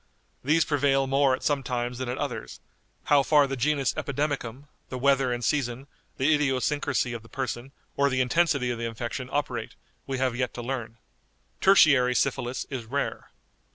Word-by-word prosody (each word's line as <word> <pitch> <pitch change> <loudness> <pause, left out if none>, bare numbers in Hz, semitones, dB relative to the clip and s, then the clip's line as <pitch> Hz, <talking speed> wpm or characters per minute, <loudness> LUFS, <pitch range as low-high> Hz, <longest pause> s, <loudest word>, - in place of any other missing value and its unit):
These 155 +5 +3
prevail 140 -2 +2
more 135 0 +3
at - - -12
some 145 -2 +1
times 125 -1 -3
than 130 -1 -3
at 125 - -3
others; - - -5 0.4
how 145 -1 +4
far 145 +1 +4
the 135 0 -3
genus 140 +1 +1
epidemicum, 140 -3 -3 0.3
the 130 - -4
weather 135 -1 +2
and 120 0 -2
season, 130 -3 -1 0.3
the 145 +4 +3
idiosyncrasy 140 -2 0
of 115 - -6
the 115 - -17
person, 130 0 -4 0.2
or 140 0 +3
the 130 -1 0
intensity 130 -1 +2
of 120 - -4
the 115 - -2
infection 120 +3 -5
operate, 145 0 -2 0.3
we 135 -1 -2
have 130 -2 0
yet 125 0 -2
to 120 - -5
learn." 120 -3 -4 0.6
"_Tertiary 140 -10 +5
syphilis 130 -2 -1
is 125 -4 -4
rare. 140 +5 -3
130 Hz, 170 wpm, -26 LUFS, 125-140 Hz, 0.6 s, Tertiary